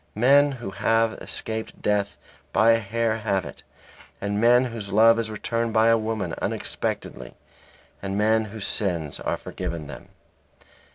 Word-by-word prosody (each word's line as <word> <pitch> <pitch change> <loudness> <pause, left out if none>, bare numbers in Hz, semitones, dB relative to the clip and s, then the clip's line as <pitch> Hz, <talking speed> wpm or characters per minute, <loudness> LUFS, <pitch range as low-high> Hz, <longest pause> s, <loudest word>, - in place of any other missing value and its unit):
Men 140 +5 +5
who 120 -7 -7
have 115 +3 +1
escaped 110 0 -5
death 100 -1 0 0.3
by 110 +4 +5
a 115 - +4
hair 115 +1 -1
have 100 -3 -1
it, - - -10 0.6
and 100 +1 -2
men 120 +2 +5
whose 105 -4 -6
love 115 +2 +6
is 115 -1 -2
returned 115 +1 -2
by 110 +1 +4
a 115 - +6
woman 110 -6 -3
unexpectedly, 65 -2 -4 0.7
and 95 0 -3
men 110 +1 +2
whose 105 -1 -6
sins 85 -8 -2
are - - -2
forgiven 85 -4 -5
them. 70 - -10
110 Hz, 150 wpm, -24 LUFS, 100-115 Hz, 0.7 s, love